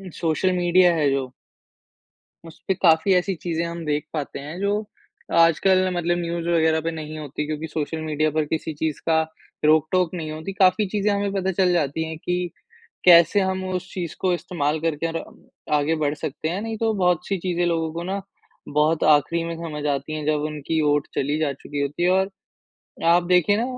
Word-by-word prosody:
social 170 +3 +1
media 175 0 +4
है 150 -3 +2
जो 135 -2 -2 1.2
उसपे 165 +4 -4
काफ़ी 165 +1 +4
ऐसी 185 +2 +1
चीजें 170 -1 -3
हम 170 0 -5
देख 150 -1 -1
पाते 150 -3 -4
हैं 150 +5 -7
जो 200 0 +1 0.7
आजकल 185 +3 +4
मतलब 175 0 0
न्यूज़ 170 0 -3
वग़ैरह 160 -2 +3
पे 165 +1 -2
नहीं 155 -1 -7
होती 150 0 -5
क्योंकि 155 +1 -4
सोशल 160 +1 -3
मीडिया 155 0 0
पर 155 +1 0
किसी 160 0 -2
चीज़ 155 0 -2
का 160 -1 +4 0.4
रोक 155 0 +4
टोक 185 -2 +1
नहीं 160 -3 -4
होती, 160 +5 -6
काफ़ी 195 +2 +3
चीजें 210 +1 0
हमें 200 0 0
पता 190 -1 -1
चल 185 0 +2
जाती 160 -2 0
है 160 - -6
कि 180 +2 -2 0.5
कैसे 170 +2 +7
हम 190 0 -1
उस 185 +1 -4
चीज़ 175 -3 -4
को 185 -1 +2
इस्तेमाल 155 -3 -2
करके 165 0 -1
और 165 0 -4 0.5
आगे 150 +2 +2
बढ़ 150 -2 0
सकते 150 +1 -4
हैं, 180 +4 -2
नहीं 225 0 -4
तो 225 0 +1
बहुत-सी 180 0 +1
चीजें 175 0 -1
लोगों 165 -2 0
को 170 +1 -4
ना 190 +3 -3 0.5
बहुत 150 +2 +2
आखरी 150 +3 +2
में 165 0 -4
समझ 155 -3 -6
आती 140 +2 -4
हैं 155 -1 -4
जब 150 -1 +1
उनकी 150 +2 -2
वोट 145 -1 +2
चली 145 +3 0
जा 155 -3 0
चुकी 145 +1 -6
होती 140 +4 -2
है 180 - +4
और 190 +1 +2 0.8
आप 175 +1 +5
देखिए 180 +3 +3
ना 225 - 0
165 Hz, 190 wpm, -23 LUFS, 155-180 Hz, 1.2 s, कैसे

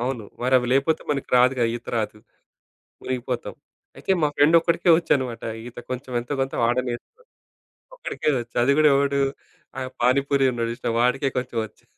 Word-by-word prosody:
అవును. 120 -3 -3 0.2
మరివి 125 -1 +3
లేకపోతే 140 +4 +2
మనకి 140 -2 -2
రాదుగా! 125 0 +4
ఈత 120 - -8
రాదు. 105 -1 -2 0.8
మునిగిపోతాం. 125 -1 -4 0.4
అయితే 190 - -1
మా 150 - +4
ఫ్రెండ్ 150 +4 +5
ఒక్కడికే 170 +1 +1
వచ్చనమాట. 130 -8 -1 0.2
ఈత 120 - -10
కొంచెం 130 0 -5
ఎంతో 125 +4 -4
కొంత 135 0 -2
వాడే‌నేర్చుకున్నడు. 120 - -2 0.8
ఒకడికే 155 - -2
వచ్చు 120 0 -8
అది 140 +3 +4
గూడా 155 0 +6
ఎవడు 140 0 +1 0.6
ఆ - - -2 0.2
పానీపూరి 135 +2 +3
ఉన్నాడు 115 -1 -2
జూసినవా? 115 -1 -3
వాడికే 135 +2 +1
కొంచెం 125 -2 -4
వచ్చు. 105 - -24
130 Hz, 150 wpm, -23 LUFS, 120-140 Hz, 0.8 s, గూడా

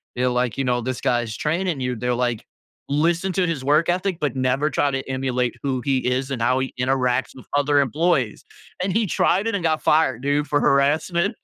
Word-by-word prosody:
they're 125 +1 +1
like, 125 -2 -1
"You 135 - 0
know, 125 -1 0
this 130 +1 -4
guy's 120 -3 0
training 165 - -1
you." 125 -1 -2
They're 125 +2 -1
like, 120 -2 -1 0.5
"Listen 170 +6 +1
to 185 0 +1
his 160 -6 -3
work 150 +5 +3
ethic, 185 0 0
but 145 -4 -1
never 130 +3 +1
try 145 -2 +1
to 135 0 -4
emulate 130 -2 -1
who 130 -3 -1
he 135 -2 +1
is 130 +2 -1
and 130 -4 -3
how 125 +3 +2
he 130 - -3
interacts 125 0 +1
with 130 - -13
other 145 0 +3
employees," 140 -3 0 0.4
and 190 - 0
he 225 -1 +2
tried 190 +4 +1
it 225 - 0
and 185 - -3
got 160 -1 +1
fired, 150 -6 +2
dude, 145 +1 0
for 145 - +1
harassment. 155 +7 +2
135 Hz, 210 wpm, -22 LUFS, 125-160 Hz, 0.5 s, work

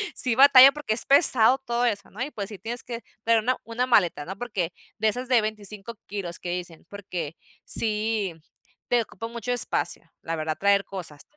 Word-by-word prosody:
sí 245 -3 +2
batallo, 270 0 +8
porque 295 -7 -3
es 225 - +4
pesado 260 -4 +5
todo 240 +1 0
eso, 205 -4 -2
¿no? 220 - -9
Y, 295 - -6
pues, 200 -1 -6
sí 205 -4 -10
tienes 230 +4 -6
que 235 -1 -7 0.2
traer 230 -1 +3
una 250 +4 -1
una 235 +2 -2
maleta, 175 -10 +2
¿no? 190 +2 -7
Porque 195 -8 -4 0.2
de 220 - 0
esas 250 +4 -2
de 240 -3 +4
25 215 0 -5
kilos 190 -4 -5
que 175 - -7
dicen, 175 -2 -7
porque 180 -6 -6 0.3
sí, 215 -3 0 0.6
te 245 -1 +3
ocupa 225 +1 -8
mucho 235 +1 -5
espacio, 245 - 0
la 165 0 -4
verdad, 155 0 -3
traer 200 0 +3
cosas. 160 -7 -8
215 Hz, 190 wpm, -25 LUFS, 190-240 Hz, 0.6 s, batallo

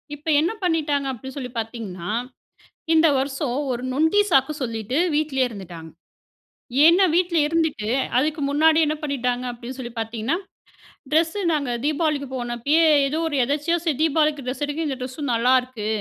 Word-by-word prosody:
இப்ப 295 +2 -17
என்ன 335 +6 +1
பண்ணிட்டாங்க 300 -5 0
அப்பிடி 265 +1 -8
சொல்லி 250 -3 -5
பாத்தீங்கன்னா. 210 -6 -6 0.8
இந்த 325 0 +5
வருஷம் 270 -1 -2 0.2
ஒரு 245 0 -4
நொண்டி 320 +9 +3
சாக்கு 270 +1 +3
சொல்லிட்டு 230 +1 -3 0.2
வீட்லேயே 280 -4 +1
இருந்துட்டாங்க. 175 -7 -9 0.9
ஏன்னா 345 +4 +6
வீட்ல 345 -1 +2
இருந்துட்டு 320 -9 -1 0.3
அதுக்கு 300 +3 0
முன்னாடி 315 +2 +4
என்ன 305 +1 -1
பண்ணிட்டாங்க 250 -4 -2
அப்பிடின்னு 245 +2 -8
சொல்லி 240 -2 -6
பாத்தீங்கன்னா, 225 +6 -2 0.8
ட்ரெஸ்ஸு 330 +5 +1
நாங்க 280 -5 -1
தீபாவளிக்கு 300 -2 0
போனப்பயே 245 +7 +1 0.2
ஏதோ 310 +3 -2
ஒரு 290 - -2
எதாச்சியா 295 +6 0
சரி 310 -6 0
தீபாவளிக்கு 305 -2 +1
ட்ரெஸ் 265 +3 -4
எடுக்க 310 +2 -3
இந்த 270 - -3
ட்ரெஸ்ஸும் 255 +1 -4
நல்லாருக்கு. 250 -2 +1
280 Hz, 140 wpm, -23 LUFS, 245-310 Hz, 0.9 s, ஏன்னா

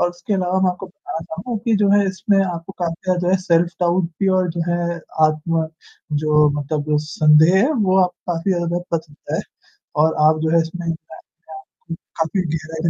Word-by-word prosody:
और 175 - +2
उसके 175 +4 -4
अलावा 185 0 0
मैं 190 - +3
आपको 180 +2 -7
बताना 185 -3 -7
चाहूँगा 205 +7 -5
कि 225 -2 +2
जो 200 -1 +2
है 205 0 +4
इसमें 195 +2 +1
आपको 175 0 -5
काफ़ी 175 +2 -1
जो 175 - 0
है 190 - +4
सेल्फ 170 -2 +3
डाउट 175 +1 +2 0.2
भी 195 - +2
और 180 -1 +1
जो 170 +1 -4
है, 170 0 -1 0.3
आत्म 160 +1 -1 0.6
जो 150 0 +4
मतलब 150 +1 -1
संदेह 155 +3 +5
है, 255 +10 +3
वो 190 -8 +2
आपका 180 0 -5
काफ़ी 170 +4 0
ज़्यादा 175 0 -1 0.2
बच 160 - -6
सकता 145 -1 -8
है - - 0 0.6
और 160 - +2
आप 155 0 +1
जो 160 - +1
है 165 - +5
इसमें 165 +1 -4
क - - -7 1.0
क - - -2 0.2
काफ़ी 160 +4 0
गहराई 160 -1 -4
175 Hz, 195 wpm, -20 LUFS, 160-190 Hz, 1.0 s, संदेह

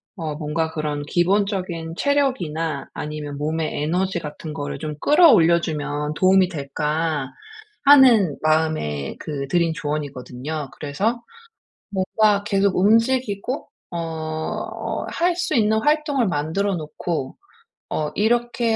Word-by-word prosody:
어 160 -6 -4
뭔가 160 +1 -2
그런 150 -2 -3
기본적인 180 -1 0
체력이나 175 - 0
아니면 150 -1 -5
몸의 155 0 -2
에너지 180 +4 0
같은 155 0 -7
거를 145 -2 -4
좀 150 -1 -4
끌어올려 225 - +6
주면 150 -1 -3
도움이 185 +1 +4
될까? 150 -1 -2 0.5
하는 250 - +6
마음에 155 - 0
그 140 -3 -4
드린 170 +3 +2
조언이거든요. 145 -1 -4
그래서 200 +12 -2 0.7
뭔가 200 +1 +2
계속 200 -1 +1
움직이고 230 +4 +1 0.2
어 160 -2 -3 0.4
할 350 0 +1
수 360 - -1
있는 220 -2 +3
활동을 295 -4 +2
만들어 185 +5 -1
놓고 155 -2 -4 0.6
어 150 -1 -1
이렇게 235 +1 +1
165 Hz, 255 characters per minute, -22 LUFS, 150-205 Hz, 0.7 s, 끌어올려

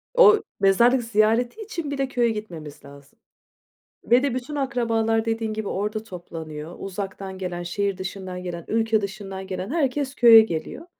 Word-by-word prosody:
O 435 -4 +7 0.2
mezarlık 235 +6 +4
ziyareti 230 - +1
için 340 -9 -5
bile 275 -1 -1
köye 245 -3 +1
gitmemiz 170 -11 -7
lazım 140 0 -16 0.8
ve 245 +3 +4
de 280 -3 0
bütün 255 +4 -5
akrabalar 230 -5 0
dediğin 225 -1 -1
gibi 215 -2 -4
orada 210 +3 -2
toplanıyor. 165 -4 -8
Uzaktan 195 0 -6
gelen, 180 -2 -4
şehir 200 +2 -2
dışından 185 -1 -6
gelen, 170 -2 -6
ülke 225 -1 +1
dışından 195 -1 -6
gelen 185 +1 -4
herkes 285 -3 -1
köye 230 -4 +9
geliyor. 195 - -4
215 Hz, 145 wpm, -24 LUFS, 185-245 Hz, 0.8 s, köye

